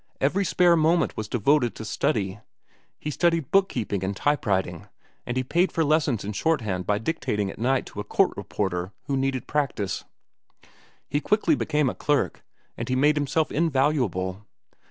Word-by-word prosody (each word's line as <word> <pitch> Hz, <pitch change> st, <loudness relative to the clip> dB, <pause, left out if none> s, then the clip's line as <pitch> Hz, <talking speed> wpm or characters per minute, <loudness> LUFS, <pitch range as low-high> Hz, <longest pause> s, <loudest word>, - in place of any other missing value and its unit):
Every 170 Hz, +9 st, +2 dB
spare 175 Hz, -2 st, +4 dB
moment 165 Hz, +2 st, +2 dB
was 110 Hz, -, -4 dB
devoted 120 Hz, +3 st, +2 dB
to 110 Hz, -, -7 dB
study. 100 Hz, -2 st, -1 dB, 0.6 s
He 150 Hz, -, -4 dB
studied 165 Hz, -1 st, +1 dB
book 195 Hz, 0 st, +4 dB
keeping 105 Hz, -5 st, -2 dB
and 95 Hz, +1 st, -2 dB
type 145 Hz, -4 st, 0 dB
writing, 95 Hz, -4 st, -1 dB, 0.4 s
and 120 Hz, -, -2 dB
he 130 Hz, -, +1 dB
paid 175 Hz, +8 st, +1 dB
for 165 Hz, -, +1 dB
lessons 145 Hz, -7 st, +1 dB
in 105 Hz, -, -3 dB
shorthand 110 Hz, -, -1 dB
by 105 Hz, -, +2 dB
dictating 105 Hz, -6 st, -2 dB
at -, -, -13 dB
night 130 Hz, +3 st, +1 dB
to -, -, -9 dB
a -, -, -2 dB
court -, -, +2 dB
reporter 90 Hz, -1 st, -3 dB
who 140 Hz, -, -2 dB
needed 135 Hz, -1 st, -1 dB
practice. 135 Hz, -10 st, -1 dB, 1.0 s
He 145 Hz, -, -1 dB
quickly 210 Hz, -4 st, +2 dB
became 150 Hz, -1 st, +1 dB
a -, -, 0 dB
clerk, 145 Hz, -1 st, 0 dB, 0.3 s
and -, -, -5 dB
he 130 Hz, -, +1 dB
made 145 Hz, +3 st, +4 dB
himself 150 Hz, +2 st, 0 dB
invaluable. 130 Hz, -, 0 dB
135 Hz, 170 wpm, -25 LUFS, 105-155 Hz, 1.0 s, spare